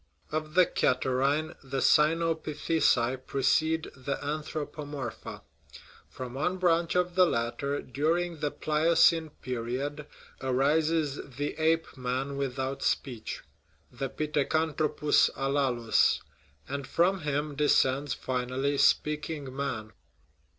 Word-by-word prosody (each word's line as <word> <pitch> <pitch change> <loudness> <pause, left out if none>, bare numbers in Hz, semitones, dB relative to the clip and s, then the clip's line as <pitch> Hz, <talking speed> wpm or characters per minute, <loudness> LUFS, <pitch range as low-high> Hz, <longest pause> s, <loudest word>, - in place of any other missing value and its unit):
Of 155 0 -3
the 185 -1 +7
catarrhinae, 135 +5 +1
the 135 0 -4
cynopitheci 155 -4 +2
precede 160 +4 +1
the 135 +1 -3
anthropomorpha; 145 -3 -5 0.7
from 125 -1 -7
one 180 +8 -1
branch 170 -2 +2
of 180 0 +1
the 185 0 +5
latter, 140 +3 -2
dur 150 +6 0
ing 175 -2 -3
the 150 - 0
Pliocene 160 +2 +3
period, 130 +5 -3 0.3
arises 145 +3 +1 0.2
the 145 +1 -2
ape 165 +1 +1
man 130 +2 -2
without 135 0 -3
speech 125 -4 -2 0.5
(the 135 - -4
pithecanthropus 150 +1 +1
alalus); 130 -6 +2 0.5
and 140 -1 -4
from 180 +7 +2
him 150 0 -2
de 150 0 +1
scends, 135 +2 +2
finally, 130 +2 -1
speaking 150 -3 +1
man. 130 -6 -3
145 Hz, 105 wpm, -29 LUFS, 130-155 Hz, 0.7 s, the